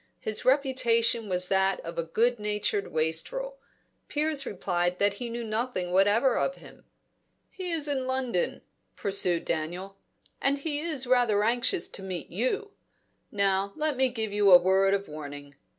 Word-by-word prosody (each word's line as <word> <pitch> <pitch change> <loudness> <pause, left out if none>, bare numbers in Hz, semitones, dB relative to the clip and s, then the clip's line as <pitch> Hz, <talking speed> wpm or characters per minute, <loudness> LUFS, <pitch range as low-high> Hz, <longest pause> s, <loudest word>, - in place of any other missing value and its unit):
His 215 -1 -2
reputation 235 -5 +2
was 180 0 +1
that 190 0 +2
of 165 0 -6
a - - 0
good 230 +8 +1
natured 210 -1 -1
wastrel. 335 - -1 0.5
Piers 300 -2 -1
replied 180 -2 -1
that 200 +1 +2
he 240 - -3
knew 235 +1 -4
nothing 220 -5 -2
whatever 205 +7 +3
of 275 - 0
him. - - -16 0.7
"He 370 -2 -6
is 315 -3 -1
in 265 -3 -1
London," 260 - -1 0.3
pursued 185 -4 +1
Daniel, 175 +5 -4 0.4
"and 275 +1 +3
he 290 0 -2
is 305 -5 -1
rather 245 -5 +3
anxious 245 - +1
to - - -8
meet 185 -2 -6
you. 255 - -2 0.6
Now 200 -1 +1
let 310 -2 0
me 260 0 +3
give 220 -4 -3
you 205 -1 +3
a 180 - +11
word 190 +2 +3
of 200 0 -4
warning. 145 -2 -9
215 Hz, 155 wpm, -27 LUFS, 190-260 Hz, 0.7 s, a